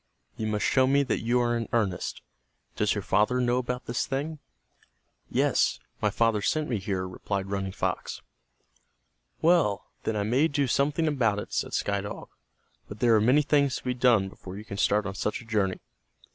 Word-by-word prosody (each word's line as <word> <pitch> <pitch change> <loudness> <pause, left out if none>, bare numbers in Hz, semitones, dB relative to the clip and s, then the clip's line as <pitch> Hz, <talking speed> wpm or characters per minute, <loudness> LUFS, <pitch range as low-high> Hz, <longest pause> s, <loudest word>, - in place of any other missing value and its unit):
You 110 -2 -3
must 105 -1 0
show 130 -1 +4
me 140 +1 +4
that - - -1
you 120 +2 +1
are 120 0 +1
in 115 -1 -3
earnest. 100 -7 -1 0.5
Does - - +1
your - - -3
father 105 +6 +2
know 125 0 +2
about 125 0 -4
this 120 - -2
thing!" 145 +3 -3 0.9
"Yes, - - +2 0.2
my 105 - +3
father 115 0 +1
sent 155 +7 0
me 115 -5 -1
here," 95 -1 -2
replied 95 +1 -4
Running 95 -1 -2
Fox. - - -3 1.2
"Well, 160 - +3
then 110 - -2
I 105 - 0
may 125 +9 +3
do 145 -2 0
something 145 +5 +1
about 120 -9 +1
it," 105 - -6
said - - -2
Sky 100 -1 0
Dog. 100 - -7 0.6
"But 105 - -9
there 120 -2 +4
are 110 - +5
many 130 +7 +4
things 140 -3 +2
to - - -6
be 125 - -1
done 120 -5 +3
before 95 0 -10
you 105 - -9
can 100 - -7
start 105 +1 +2
on 100 - -3
such 105 +2 -2
a 120 - -12
journey." 105 -4 0
115 Hz, 190 wpm, -27 LUFS, 100-130 Hz, 1.2 s, are